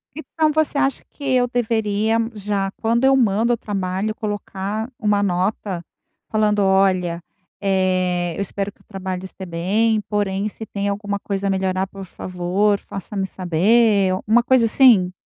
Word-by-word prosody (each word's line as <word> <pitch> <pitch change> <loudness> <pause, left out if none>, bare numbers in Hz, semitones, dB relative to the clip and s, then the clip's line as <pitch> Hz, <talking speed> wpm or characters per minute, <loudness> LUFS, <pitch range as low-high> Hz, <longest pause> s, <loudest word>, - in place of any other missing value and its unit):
Então 315 0 0
você 310 -1 +1
acha 275 -1 0
que 285 - -13
eu 255 -2 +2
deveria 220 -2 0 0.2
já 200 -2 -2
quando 235 +2 +1
eu 270 0 +5
mando 230 -1 +2
o - - -1
trabalho, 195 0 -2
colocar 205 +1 -4
uma 210 -2 +2
nota 185 -1 -1 0.5
falando: 215 -1 +2
"Olha, 190 -3 +2 0.4
eh, 185 -2 +1
eu - - -3
espero 200 +1 -2
que - - -30
o - - -27
trabalho 190 -2 -5
este 190 0 -9
bem, 205 +6 +1
porém, 205 -1 -1
se 220 - -9
tem 200 -1 -3
alguma 200 0 -3
coisa 200 0 -3
a - - +1
melhorar, 190 0 0
por 195 0 -9
favor, 185 +3 -1
faça-me 195 0 -5
saber," 195 +3 +3 0.2
uma 230 +3 +5
coisa 250 -1 +4
assim? 220 -6 +5
200 Hz, 155 wpm, -21 LUFS, 190-220 Hz, 0.5 s, eu